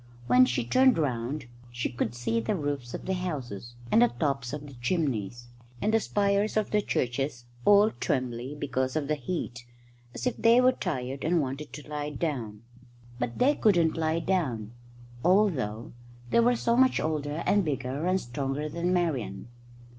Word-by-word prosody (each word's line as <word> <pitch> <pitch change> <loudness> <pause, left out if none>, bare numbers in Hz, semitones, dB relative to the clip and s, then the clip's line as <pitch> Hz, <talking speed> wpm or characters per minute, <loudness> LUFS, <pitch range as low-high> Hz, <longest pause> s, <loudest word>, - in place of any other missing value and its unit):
When 125 +1 +6
she 125 -1 -1
turned 255 - +4
round 135 -1 -2 0.3
she 120 0 -2
could 120 -1 -3
see 115 -1 0
the 115 - -1
roofs 145 -6 -3
of - - -7
the 190 - 0
houses, 125 - -5 0.2
and - - +5
the 120 - +7
tops 125 +1 -2
of 150 0 -5
the 140 - -11
chimneys, 120 - -1 0.3
and 215 - 0
the 225 - +5
spires 205 0 +1
of 215 - 0
the 210 - +3
churches 125 -5 -2 0.2
all 205 +1 +6
trembly 130 - -2
because 130 -2 -1
of 150 -3 -1
the 155 - +1
heat, 145 -4 -4 0.5
as - - -5
if 250 - +1
they 230 +1 +5
were 255 0 +6
tired 130 - -4
and 170 +1 +2
wanted 140 +1 -4
to 150 - -9
lie 150 0 -3
down. 125 -8 -4 0.6
But 120 -1 -3
they 275 +4 +4
couldn't 175 - +3
lie 160 0 0
down, 130 - -1 0.5
although 155 - +2 0.4
they - - +4
were 240 +1 +4
so 235 0 +1
much 260 +1 +4
older 155 0 -2
and 205 -1 +3
bigger 140 +1 -2
and 185 +1 +2
stronger 135 +3 -3
than 170 +3 -1
Marian. 145 - -1
145 Hz, 170 wpm, -28 LUFS, 120-180 Hz, 0.6 s, the